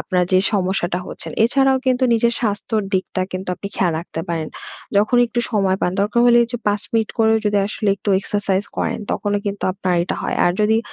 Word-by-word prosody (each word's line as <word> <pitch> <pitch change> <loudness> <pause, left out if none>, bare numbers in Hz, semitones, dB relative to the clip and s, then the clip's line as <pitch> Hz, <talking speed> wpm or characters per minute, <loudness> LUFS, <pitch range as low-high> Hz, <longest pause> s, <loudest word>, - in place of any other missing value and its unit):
আপনার 180 -2 0
যে 185 - +6
সমস্যাটা 185 -3 0
হচ্ছেন। - - -7
এছাড়াও 270 +3 +3
কিন্তু 255 0 +2
নিজের 235 +1 +2
স্বাস্থ্যর 215 0 -1
দিকটা 185 0 -1
কিন্তু 185 0 -5
আপনি 200 - -7
খেয়াল 180 -3 +2
রাখতে 165 -1 -6
পারেন, 165 -2 -2 0.5
যখন 215 +4 +3
একটু 240 +1 -2
সময় 195 -4 +1
পান। 180 - 0
দরকার 210 +4 +1
হলে 240 0 +6
এই 235 - -2
যে 240 - -2
৫ 205 0 +1
মিনিট 225 -2 +1
করেও 220 0 +4
যদি 205 -1 +2
আসলে 210 +1 -2
একটু 205 - -7
এক্সারসাইজ 200 -1 -1
করেন, - - -1
তখনও 205 -1 -1
কিন্তু 200 0 -3
আপনার 185 -2 -1
এটা 175 - -3
হয়। - - -2
আর 175 - +3
যদি 220 +1 +3
205 Hz, 205 wpm, -20 LUFS, 185-225 Hz, 0.5 s, যে